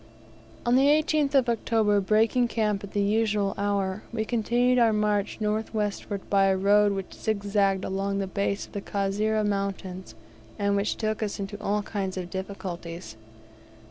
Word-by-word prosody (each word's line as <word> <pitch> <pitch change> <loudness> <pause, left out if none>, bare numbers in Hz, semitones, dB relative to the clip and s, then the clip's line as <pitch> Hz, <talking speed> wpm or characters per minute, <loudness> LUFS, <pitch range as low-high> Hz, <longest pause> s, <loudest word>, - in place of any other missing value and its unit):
On 240 - +2
the 265 +2 +5
18th 300 -1 +2
of 260 -3 +4
October, 220 -3 +2
breaking 220 +5 +3
camp 210 -4 -1
at 200 - -9
the 205 - +1
usual 210 -1 +1
hour, 200 0 -1
we 220 -2 -2
continued 245 +2 +2
our 230 -2 +5
march 210 -1 0
north 215 +1 -2
westward 205 -1 -3
by 195 -1 +3
a 190 0 +3
road 205 +1 +4
which 195 -1 -5
zig 215 -2 -2
zagged 200 -2 +1
along 195 +1 -2
the 195 - -1
base 200 +1 -2
of - - -20
the 200 - -4
Kasera 205 +2 0
mountains, 195 - -3 0.4
and 200 0 +1
which 200 +1 0
took 215 -1 -2
us 210 -2 -3
into 200 +1 -5
all 210 0 0
kinds 195 -3 -3
of 180 -2 -5
difficulties. 175 - -6
205 Hz, 170 wpm, -26 LUFS, 195-220 Hz, 0.4 s, the